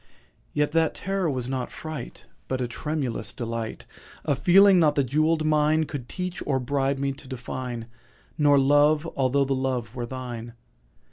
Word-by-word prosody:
Yet 150 0 +1
that 165 0 +2
terror 195 -3 -1
was 130 -4 -2
not 130 -1 -3
fright, 155 -6 -7 0.2
But 130 - -2
a 125 - -1
tremulous 130 -4 -3
delight— 115 -2 -4 0.4
A 145 - +2
feeling 185 +6 +6
not 150 -3 +4
the 140 - +3
jewelled 155 +4 +1
mine 155 +1 +3
Could 145 -5 -6
teach 180 -1 -4
or 135 -2 +2
bribe 135 +1 0
me 140 0 -1
to 135 0 -10
define— 125 -2 -5 0.5
Nor 145 -2 +4
Love—although 145 -1 +3
the 135 - 0
Love 130 -4 -2
were 120 -1 -3
thine. 120 -2 -6
140 Hz, 155 wpm, -25 LUFS, 125-155 Hz, 0.5 s, feeling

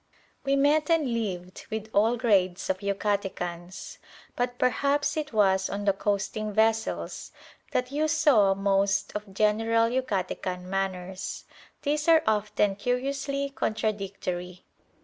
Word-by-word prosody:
We 275 0 +2
met 290 +2 +3
and 310 -7 +2
lived 185 -5 -4
with 220 0 -4
all 225 +4 +3
grades 190 -7 +2
of 185 - -4
Yucatecans; 195 -3 -3 0.4
but 245 0 -1
perhaps 285 +3 +1
it 305 -1 -3
was 190 -3 +3
on 205 +1 -4
the 200 - +4
coasting 205 +2 -2
vessels 220 +1 0 0.4
that 250 +1 -1
you 300 +2 +1
saw 290 -11 +4
most 195 0 +1
of 210 -1 -5
general 225 +3 +2
Yucatecan 195 -7 -2
manners. 190 0 -3 0.4
These 300 +1 0
are 325 -1 +6
often 210 -2 +1
curiously 275 +4 -1
contradictory. 195 -6 -3
210 Hz, 120 wpm, -27 LUFS, 195-255 Hz, 0.4 s, are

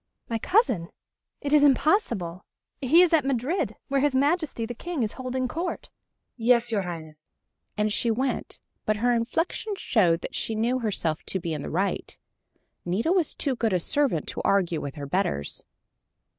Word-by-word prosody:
"My 230 -1 -2
cousin 245 - +2 0.5
it 285 0 -2
is 300 - +7
impossible. 265 - +2 0.4
He 310 +7 +6
is 345 - +2
at 315 -4 +5
Madrid, 270 +6 -1
where 275 -1 +1
his 285 -2 +2
Majesty 285 -3 +1
the 245 - -5
King 330 +1 -3
is 215 - -1
holding 255 0 -3
Court." 335 +7 -4 0.4
"Yes, 240 0 +3
your 210 -3 +1
Highness," 160 -4 -8 0.5
and 210 0 +1
she 235 - +2
went, 255 +4 -2 0.2
but 215 0 0
her 245 +3 +2
inflection 330 - -1
showed 175 - +2
that - - -6
she 225 - -1
knew 240 +4 +1
herself 180 -9 -1
to 190 - -1
be 170 -2 -3
in 150 - -3
the - - -5
right. 195 +4 -2 0.7
Nita 200 - 0
was 360 -5 +2
too 270 -3 0
good 225 -4 0
a 180 - +3
servant 265 - +1
to - - -4
argue 175 -5 +2
with 140 - -6
her 145 -2 -6
betters. 140 - -1
235 Hz, 170 wpm, -26 LUFS, 185-285 Hz, 0.7 s, is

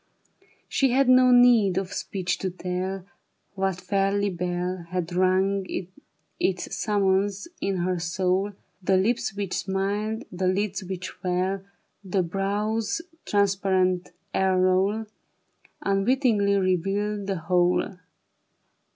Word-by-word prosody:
She 270 - +2
had 270 0 +3
no 255 0 +6
need 240 -6 +6
of 190 0 -2
speech 185 -3 -2
to 190 - -1
tell 185 +1 -4 0.5
What 190 -2 -1
fairy 195 +1 0
bell 180 0 -3
Had 180 -1 -3
rung 190 +2 +2 0.8
its 185 -2 -1
summons 200 - +1
in 195 -1 0
her 180 0 0
soul; 185 +4 0 0.3
The 190 +1 +3
lips 230 +2 0
which 200 -3 -3
smiled, 205 +3 -1
the 185 +1 -1
lids 195 +2 0
which 185 0 -5
fell, 185 +1 -2 0.4
The 190 -1 0
brow's 205 - -1 0.2
transparent 190 -3 +1 0.2
aureole, 190 +3 +2 0.8
Unwittingly 200 0 +2
revealed 195 +2 0
the 195 -2 -1
whole. 180 +2 +1
195 Hz, 110 wpm, -25 LUFS, 185-205 Hz, 0.8 s, no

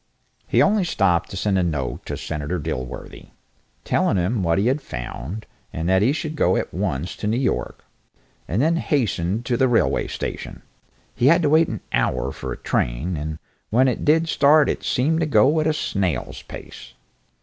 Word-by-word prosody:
He - - +4
only 210 -1 +3
stopped 90 - +1
to 95 - -6
send 100 -1 +1
a - - +2
note 75 -7 -3
to - - -3
Senator 75 +3 -3
Dilworthy, 70 -6 -6 0.6
telling - - +2
him 95 +5 0
what 85 -1 +1
he 100 - +1
had 135 +5 +1
found, 65 - -6 0.3
and 80 +1 -3
that 95 0 +4
he 115 +6 +4
should 155 +1 -3
go - - +2
at - - -3
once 70 +7 -2
to 105 - -3
New 110 +3 +1
York, 130 -1 -2 0.6
and 105 - 0
then 165 +2 +2
hastened 115 - 0
to 120 -2 0
the 130 - +3
railway 120 -2 +2
station. - - -6 0.5
He 120 - +2
had 170 +4 +5
to 150 - +3
wait 160 +1 +5
an 110 - -5
hour - - 0
for - - -6
a - - -5
train, 70 +10 -1
and 75 +1 -4 0.3
when 130 +4 +4
it 125 - -1
did 160 +2 +3
start 150 -1 +4
it - - -2
seemed 155 +6 +1
to 165 - +1
go 145 +1 +4
at 155 - +1
a - - +3
snail's 95 - -2
pace. - - -11
110 Hz, 190 wpm, -22 LUFS, -, 0.6 s, had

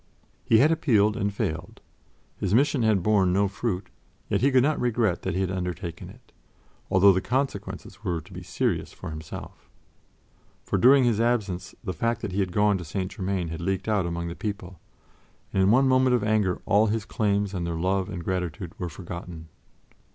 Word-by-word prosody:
He 110 - +4
had 145 +8 +5
appealed 110 -10 +3
and 100 0 -1
failed 85 -3 -4 0.6
his 100 +1 +1
mission 140 +1 +3
had 110 -5 +2
borne 100 -3 +3
no 100 +2 +2
fruit, 100 -1 -3 0.4
yet - - +1
he 135 - +4
could 130 -2 +4
not 150 +1 +1
regret 115 -6 +1
that 95 -2 -3
he 95 - 0
had 95 -1 -1
undertaken 90 -2 -5
it, - - -17 0.6
although 95 +2 +6
the 95 - 0
consequences 130 +5 -3
were 85 -2 -1
to 75 - -14
be - - -7
serious - - -2
for - - -8
himself. 80 0 -9 0.9
For 100 - -1
during 130 +5 +6
his 115 -3 +2
absence 105 -7 -1
the 95 -5 -3
fact 115 +1 -1
that 100 - -4
he 95 - -2
had 95 -2 0
gone 105 0 +2
to - - -6
St. 95 +4 -4
Germain 95 -3 -2
had 80 +1 -6
leaked 95 +2 -2
out 105 -5 +1
among 85 0 -3
the 85 - -4
people, 95 -5 -6 0.7
and 95 - +2
in 95 - +4
one 130 +5 +5
moment 130 -1 +4
of 120 - 0
anger 105 -4 +1
all 110 +1 +4
his 110 0 -1
claims 100 -2 0
on 90 -3 -3
their 85 -1 -3
love 95 +3 0
and 90 -4 -5
gratitude 90 -2 -3
were 90 - -3
forgotten. 85 -1 -8
100 Hz, 195 wpm, -26 LUFS, 90-110 Hz, 0.9 s, although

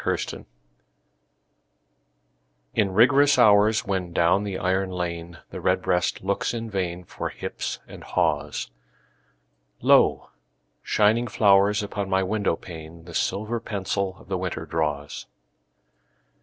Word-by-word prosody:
XVII—WINTER - - -3 2.3
In 100 -2 +1
rigorous 135 +7 +5
hours, 105 -2 +5
when 95 -3 -2
down 85 +4 +2
the 100 -2 -3
iron 95 +1 0
lane 85 -2 -5
The - - -7
redbreast 90 -1 +1
looks 100 +4 -1
in 115 -1 -5
vain 90 -2 -3
For - - -5
hips - - -5
and - - -11
haws, 75 -5 -1 1.1
Lo, - - +3 0.5
shining 110 +3 +2
flowers 100 -1 +4
upon 100 -1 -4
my 95 0 +2
window 100 -2 0
pane 80 -1 -11
The 85 - -11
silver 105 +8 -1
pencil 100 -3 -3
of - - -17
the 95 -1 -2
winter 90 -1 -4
draws. 75 -3 -3
95 Hz, 115 wpm, -24 LUFS, 85-105 Hz, 2.3 s, rigorous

